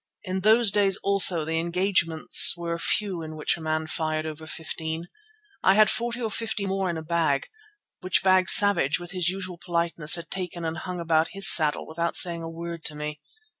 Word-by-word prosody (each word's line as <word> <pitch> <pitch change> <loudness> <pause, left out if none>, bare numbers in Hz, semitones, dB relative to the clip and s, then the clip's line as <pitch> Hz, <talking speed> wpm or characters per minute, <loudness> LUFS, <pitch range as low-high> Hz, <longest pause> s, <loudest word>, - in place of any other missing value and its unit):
In 185 -2 -4
those 215 +2 +3
days 200 -1 +1
also 190 -5 +4
the 160 +1 -2
engagements 170 -2 +3
were 170 -1 -4
few 190 -1 -1
in 155 -1 -9
which 155 - -1
a 170 - -12
man 155 0 -3
fired 155 0 -3
over 155 0 -8
fifteen. 160 +1 -6 0.5
I 190 - +3
had 215 0 +4
forty 235 +1 -4
or 225 -3 -4
fifty 220 -2 -3
more 195 -1 -2
in 170 - -4
a 160 - -7
bag, 160 -4 -1 0.5
which 185 0 0
bag 185 -1 +2
Savage 180 -8 +4
with 175 -1 -9
his 180 -2 -1
usual 185 -2 -7
politeness 170 -3 +1
had 170 - -10
taken 180 -2 -6
and 160 0 -4
hung 180 +2 -7
upon 165 -1 0
his 195 +1 +4
saddle 155 -3 +6
without 170 +1 -4
saying 170 -2 +2
a 165 - -7
word 170 0 -8
to 150 - -1
me. 150 0 -7
170 Hz, 195 wpm, -24 LUFS, 160-190 Hz, 0.5 s, saddle